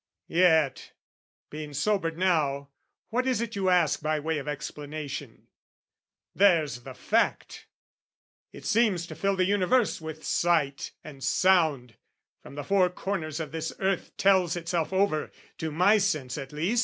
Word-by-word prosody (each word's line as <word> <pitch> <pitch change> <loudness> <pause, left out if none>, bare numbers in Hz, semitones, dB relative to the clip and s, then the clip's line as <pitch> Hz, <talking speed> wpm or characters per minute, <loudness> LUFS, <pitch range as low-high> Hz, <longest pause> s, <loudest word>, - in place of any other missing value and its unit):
Yet, 160 -6 +3 0.6
being 150 -1 -7
sobered 165 0 0
now, 150 -6 +1 0.4
what 250 +3 0
is 255 -3 +1
it 230 -1 -3
you 190 -2 +1
ask 175 -5 +3
By 155 0 0
way 160 +1 -2
of 145 - -8
explanation? 145 -2 -6 0.9
There's 160 -11 +3
the - - -10
fact! - - -1 0.8
It - - -12
seems 210 -6 +2
to - - -9
fill 195 0 0
the 185 -1 +2
universe 205 +2 +2
with 160 0 -7
sight 160 -5 0
And 140 -3 -10
sound, 150 - +2 0.4
from - - -12
the 145 - -5
four 185 +3 +3
corners 175 -4 -4
of 155 -4 -5
this 160 0 -4
earth 190 -1 -2
Tells 190 -3 +3
itself 170 -1 -2
over, 190 -5 +1 0.3
to 160 - -2
my 185 +7 +4
sense 155 -11 -1
at 135 -2 -7
least. 175 +11 0
165 Hz, 145 wpm, -27 LUFS, 150-190 Hz, 0.9 s, my